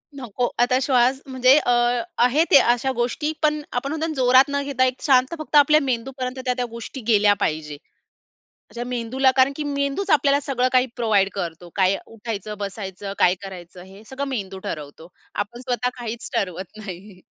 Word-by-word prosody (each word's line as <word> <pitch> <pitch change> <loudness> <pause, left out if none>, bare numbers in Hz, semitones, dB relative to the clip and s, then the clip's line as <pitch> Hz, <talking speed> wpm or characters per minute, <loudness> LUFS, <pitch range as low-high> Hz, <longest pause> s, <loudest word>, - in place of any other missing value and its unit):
नको, 245 -2 -2
आता 250 +1 +3
श्वास 260 0 +2
म्हणजे 260 +1 +4
अ, 245 - 0 0.5
आहे 280 +6 +3
ते - - +9 0.2
अशा 255 +2 -2
गोष्टी, 245 +6 -1
पण 300 0 +2
आपण 245 +3 -2
म्हणतो 315 +1 -2
ना, 320 - -3
जोरात 255 0 +5
न 280 0 -1
घेता 270 -2 +1
एक 255 0 -2
शांत 260 0 +3
फक्त 310 -1 -5
आपल्या 295 +1 +6
मेंदूपर्यंत 255 0 -3
त्या-त्या 250 -1 0
गोष्टी 235 +3 -8
गेल्या 210 -2 +5
पाहिजे. 150 -1 -2 0.9
त्याच्या 240 +1 -6
मेंदूला 250 +2 +1
कारण 260 +2 +4
की 305 - -4
मेंदूच 280 +6 -2
आपल्याला 285 -1 +4
सगळं 260 -3 0
काही 255 0 +4
प्रोव्हाईड 215 -5 +2
करतो, 175 -2 -5
काय 190 0 +2
उठायचं, 215 -2 -6
बसायचं, 195 -1 -6
काय 180 +1 +4
करायचं 180 -2 -10
हे 195 +3 -15
सगळं 275 +1 -4
मेंदू 195 -7 -4
ठरवतो 150 +1 -7 0.4
आपण 240 +4 -13
स्वतः 250 -1 -1
काहीच 235 0 -5
ठरवत 190 -1 -3
नाही. 195 -2 -10
245 Hz, 170 wpm, -22 LUFS, 200-270 Hz, 0.9 s, ते